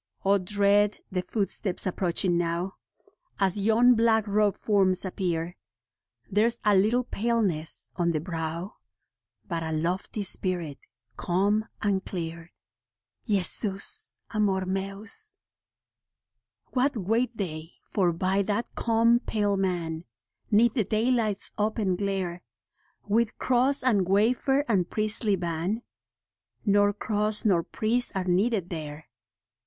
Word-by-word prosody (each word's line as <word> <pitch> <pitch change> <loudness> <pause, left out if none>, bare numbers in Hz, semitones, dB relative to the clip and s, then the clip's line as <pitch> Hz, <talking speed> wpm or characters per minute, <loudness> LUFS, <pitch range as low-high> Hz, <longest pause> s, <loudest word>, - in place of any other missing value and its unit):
O, 200 +1 +4
dread 205 +2 +2
the 185 -1 -1
footsteps 195 -1 -1
approaching 180 -1 0
now, 175 +2 -1 0.7
As 190 -2 +1
yon 225 +4 +4
black 225 -2 +2
robed 205 -1 +1
forms 195 -3 +1
appear: 175 -2 -3 0.7
There's 230 +4 +1
a 210 -1 +4
little 220 +6 +3
paleness 210 -9 -2
on 170 -1 +1
the 155 - -1
brow, 165 +2 -5 0.7
But 170 -3 -3
a 160 0 -4
lofty 175 +6 -2
spirit, 175 -6 -3 0.4
calm 200 +4 0 0.2
and 200 -2 0
clear. 165 -1 -6 0.8
Jesus 200 - +1
Amor 195 -3 0
Mens. 195 - +2 1.3
What 260 0 0
wait 225 +4 -1
they 165 -4 -5 0.2
for 185 -4 +2
by 185 +4 0
that 210 +4 -2
calm, 230 +1 +2
pale 205 -4 -1
man, 175 -4 -2 0.4
'Neath 225 +2 +4
the 230 - +1
daylight's 220 -1 +1
open 210 -3 0
glare, 190 -2 -3 0.7
With 225 +2 +1
cross 260 +2 +1
and 205 -8 +2
wafer 245 +7 +2
and 190 -7 +1
priestly 215 -1 +2
ban? 175 +5 -3 0.8
Nor 205 -1 +4
cross 210 +1 +1
nor 185 -5 +3
priest 230 +7 +1
are 190 - -1
needed 190 +1 0
there. 155 -2 -7
200 Hz, 115 wpm, -26 LUFS, 180-220 Hz, 1.3 s, O